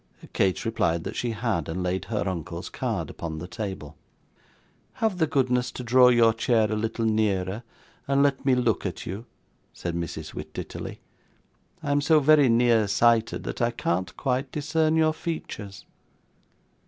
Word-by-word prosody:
Kate 95 -2 +1
replied 85 -7 0
that - - -5
she 120 - -1
had, 110 - -2
and 90 +3 -3
laid 90 +1 -1
her 105 -3 -2
uncle's 90 -4 -4
card - - -3
upon 80 -2 -6
the 85 +3 -6
table. 95 -8 -6 1.0
'Have 215 -5 -1
the 160 - +3
goodness 125 -4 +1
to 125 - -7
draw 125 +1 +6
your 115 -2 +5
chair 110 -2 +2
a - - +1
little 115 +1 -2
nearer, 105 -2 0 0.5
and 140 0 +3
let 140 -2 +1
me 135 -2 +3
look 120 -5 +1
at - - -4
you,' 100 +7 -6 0.5
said 85 - -4
Mrs. 85 -1 -5
Wititterly; - - -7 0.8
'I 145 - -1
am 145 0 +3
so 155 +1 +5
very 145 -2 +5
nearsighted 115 -1 +3
that - - -5
I 120 - +3
can't 95 -6 -2
quite 130 0 -1
discern 155 +1 +1
your 160 -1 +3
features. 105 - -6
115 Hz, 155 wpm, -26 LUFS, 95-135 Hz, 1.0 s, draw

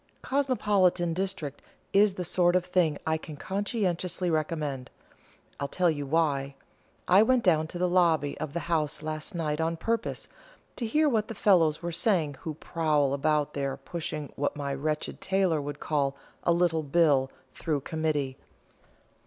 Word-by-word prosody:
'Cosmopolitan 205 -11 +2
district' 185 -6 -3 0.3
is 200 -1 +5
the 180 - -4
sort 175 +1 +2
of 180 -1 +2
thing 180 -5 +1
I 160 0 +1
can 155 -2 -9
conscientiously 185 -2 -1
recommend 150 -5 -2 0.7
I'll 140 - -1
tell 175 +3 +2
you 145 -2 -4
why: 140 -3 0 0.5
I 185 +3 +7
went 245 +2 +3
down 160 -4 +3
to 175 - -7
the 180 +1 +1
lobby 165 -5 +2
of 155 -2 -4
the 170 - -2
House 155 -3 -1
last 155 +2 -4
night 155 -2 -1
on 165 +1 -1
purpose 230 +6 -2 0.5
to 235 - -2
hear 305 +6 +3
what 220 -6 +1
the 225 - -6
fellows 170 -6 +3
were 170 - -2
saying 165 -6 +1
who 155 -2 -5
prowl 150 -4 0
about 150 +1 +1
there 140 -1 -2
pushing 155 -4 -5
what 145 - -1
my 140 -1 -3
wretched 150 +2 -3
tailor 190 -5 +1
would 145 0 -6
call 140 -3 0 0.3
'a - - +2
little 170 -2 +2
bill' 145 -3 +3 0.2
through 150 -4 -2
Committee. 150 -4 -2
160 Hz, 160 wpm, -28 LUFS, 150-180 Hz, 0.7 s, I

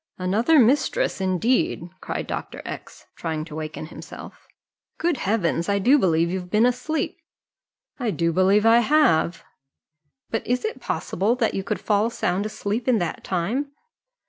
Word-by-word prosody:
"Another 215 - +2
mistress, 285 - +2
indeed!" 185 -1 +1
cried - - -4
Dr. - - -6
X, - - -8
trying 155 -1 -3
to 165 - -11
waken 155 0 -5
himself. 155 - -11 0.5
"Good 335 -3 0
Heavens! 190 -5 0
I 200 - +2
do 255 +9 +4
believe 170 -4 +2
you've 180 -1 -4
been 215 +5 +4
asleep." 250 +6 -1 0.8
"I 245 -4 -1
do 170 -4 0
believe 195 +4 +3
I 230 +1 +7
have." 240 - +3 0.9
"But 225 - -2
is 250 - 0
it 440 - -4
possible 205 +7 -1
that 240 -3 0
you 195 - -2
could 210 +1 -2
fall 210 +1 +1
sound 200 -3 -1
asleep 215 +3 -3
in 250 -3 +4
that 175 -4 -3
time?" 230 +11 -2
210 Hz, 150 wpm, -24 LUFS, 180-245 Hz, 0.9 s, I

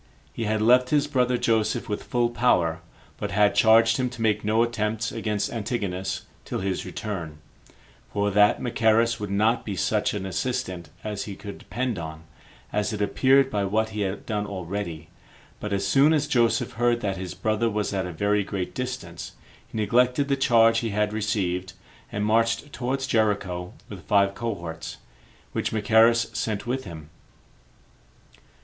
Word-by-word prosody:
He 115 - -3
had 110 0 0
left 125 +2 +5
his 145 -1 +3
brother 125 -4 +1
Joseph 115 -3 +1
with 105 - -3
full 120 -1 0
power, 90 -9 +2 0.4
but - - -3
had 100 +2 +3
charged 115 0 +5
him 125 -1 0
to 120 -1 -9
make 105 -1 +1
no 110 +2 +3
attempts 110 -2 -1
against 105 -2 -2
Antigonus 100 -4 -3 0.2
till - - -4
his 95 -1 -2
return; 85 -9 -5 0.7
for 100 0 0
that 105 +1 +4
Machaerus 115 -1 +2
would 105 -1 -4
not 110 +4 +2
be 100 - -4
such 85 +4 0
an 100 -2 -3
assistant 95 - -3
as 105 -2 -4
he 100 - -6
could 100 0 -9
depend 120 -5 -3
on, 80 -1 -7 0.5
as 105 +1 0
it 105 - -4
appeared 135 +6 +3
by 105 -1 0
what 110 +3 0
he 105 -1 -4
had 95 0 -3
done 105 -2 -2
already; 90 -4 -5 0.5
but 105 - -5
as 100 -1 0
soon 140 +9 +5
as 150 -2 +2
Joseph 120 -2 +2
heard 120 0 +1
that 100 -3 -2
his 90 -1 -6
brother 110 +4 0
was 105 -1 -2
at 95 -2 -1
a - - -5
very 100 +5 +1
great 95 -2 -4
distance, 125 -10 -5 0.3
he - - -8
neglected 125 +6 +2
the 140 - +3
charge 115 -4 +4
he 115 - -2
had 105 0 0
received, 95 -4 -1 0.4
and 105 0 -1
marched 115 +6 +1
towards 130 +2 -2
Jericho 100 -7 0
with - - -10
five 100 -1 +3
cohorts, 85 -8 -5 0.5
which - - -2
Machaerus 115 +1 +4
sent 110 -2 -2
with 130 +1 -2
him. 80 -4 -10
105 Hz, 165 wpm, -25 LUFS, 100-120 Hz, 0.7 s, left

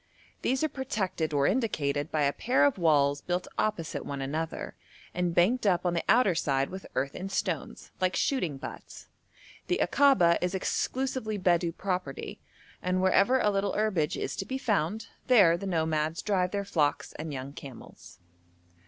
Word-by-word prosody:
These 260 +4 0
are - - +3
protected 210 - -2
or 140 -2 +2
indicated 155 - 0
by 155 -2 +1
a 140 0 +2
pair 250 +4 +2
of 280 -8 +1
walls 145 -4 +3
built 180 0 -2
opposite 205 -7 -1
one 140 -1 -5
another, 155 +4 -4 0.4
and 175 -1 -1
banked 215 +6 +3
up 180 -2 +2
on 175 - +1
the 170 - -1
outer 225 -5 +5
side 135 -3 0
with 190 +1 -8
earth 140 +2 -1
and 195 +1 -6
stones, 185 -6 -3
like 185 0 +1
shooting 180 - 0
butts. - - -9 0.6
The - - +1
Akaba 260 -13 +4
is 180 +1 -1
exclusively 255 +2 -2
Bedou 175 -2 +2
property, 180 -7 -4 0.4
and 185 0 0
wherever 195 +7 +4
a 210 - +2
little 195 0 0
herbage 190 -8 0
is - - -3
to - - -3
be 265 - -2
found, 215 - -1 0.2
there 200 -10 +6
the 195 +3 -5
nomads 160 -2 -1
drive 185 -3 +1
their 200 +1 -3
flocks 145 -6 0
and 155 0 -4
young 135 0 -6
camels. 135 -4 -12
180 Hz, 165 wpm, -28 LUFS, 155-210 Hz, 0.6 s, there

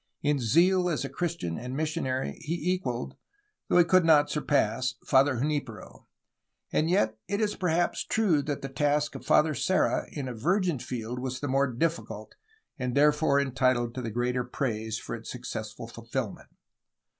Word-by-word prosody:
In 145 -1 +2
zeal 180 - +3
as 160 - -1
a - - -4
Christian 170 - -3
and 125 +3 -5
missionary 150 -4 -1
he 170 +3 -1
equaled, 125 -10 -4 0.5
though - - +3
he 175 - +8
could 185 +1 +4
not 150 -3 +5
surpass, 130 -5 +1
Father 135 0 +4
Junfpero. 135 -4 -4 0.7
And 160 - +2
yet 110 - +1
it 200 +2 -1
is 210 -2 0
perhaps 175 -1 0
true 190 -10 +2
that 145 0 -4
the - - -2
task 145 +2 0
of - - -8
Father 155 0 +4
Serra 185 +8 +1
in 140 -3 -5
a 125 - -4
virgin 175 - 0
field 120 0 -5
was 130 0 -4
the 145 - -3
more 135 +1 +2
difficult 115 -6 -3 0.5
and 125 -1 -2
therefore 150 0 +4
entitled 130 -3 +1
to 130 - -4
the 115 - -3
greater 125 +2 -1
praise 110 -3 -3
for - - -7
its 115 0 -7
successful 110 -3 -6
fulfilment. 115 0 -5
135 Hz, 165 wpm, -28 LUFS, 120-160 Hz, 0.7 s, he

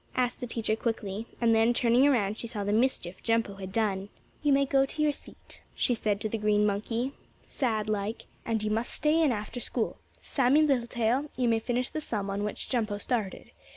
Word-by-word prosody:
asked 250 -1 0
the 245 - -4
teacher 225 -2 0
quickly, 220 -2 -3
and 230 -1 +4
then, 225 +2 +4
turning 245 +3 +4
around, 215 -7 +2
she 235 - -4
saw 215 -3 -4
the 205 +1 0
mischief 215 -6 0
Jumpo 225 -4 0
had 190 -1 -6
done. 200 -2 0 0.3
"You 295 - +2
may 275 0 +4
go 270 0 +3
to 270 +3 -5
your 300 - +4
seat," 285 - -11
she 245 - +2
said 210 -3 0
to - - 0
the 220 +1 -3
green 210 0 +3
monkey, 225 +5 -1 0.3
sad 220 -6 -1
like, 215 +1 -2 0.2
"and 225 -2 -1
you 215 - 0
must 225 +3 0
stay 310 +2 +2
in 305 -4 +4
after 215 +2 -4
school. 235 -1 -2 0.2
Sammie 275 +3 +3
Littletail, 245 0 +1
you 250 -2 +2
may 225 -1 +3
finish 245 +2 -1
the 310 - -4
sum 205 -8 -3
on 200 +1 -2
which 210 - -4
Jumpo 220 -5 -1
started. 215 -5 -3
230 Hz, 205 wpm, -29 LUFS, 210-250 Hz, 0.3 s, and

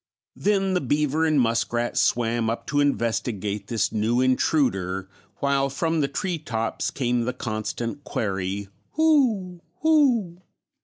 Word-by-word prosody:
Then 195 -2 +1
the 180 - +1
beaver 150 +3 +1
and 155 -2 +3
muskrat 120 0 0
swam 115 -1 +1
up 115 0 -3
to 145 - 0
investigate 115 -6 -1
this 115 -2 0
new 115 +3 +1
intruder, 110 - +1 0.3
while 140 -1 +2
from 160 +3 0
the 140 - +1
tree 170 +5 -2
tops 115 -6 -2
came 120 -2 0
the 125 - -1
constant 115 +3 -4
query, 100 -1 -3 0.3
"Who! 245 - +2 0.2
Who!" 250 - +3
130 Hz, 125 wpm, -24 LUFS, 115-165 Hz, 0.3 s, and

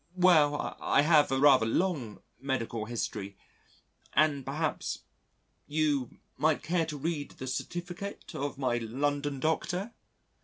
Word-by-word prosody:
"Well, 155 -5 +4
I 140 - +3
have 150 -3 +5
a 135 - +2
rather 135 -5 +6
long 135 - -1 0.2
medical 120 -5 -2
history 105 -4 -4 0.8
and 145 -2 +3
perhaps... 150 +4 -2 0.6
you... 145 -4 0 0.2
might 155 +2 +2
care 165 -1 +1
to 150 -2 -5
read 145 0 -2
the 130 - -6
certificate 175 +8 -5
of 140 0 -3
my 125 -3 0
London 140 +4 -1
Doctor?" 180 - -1
145 Hz, 120 wpm, -30 LUFS, 130-160 Hz, 0.8 s, rather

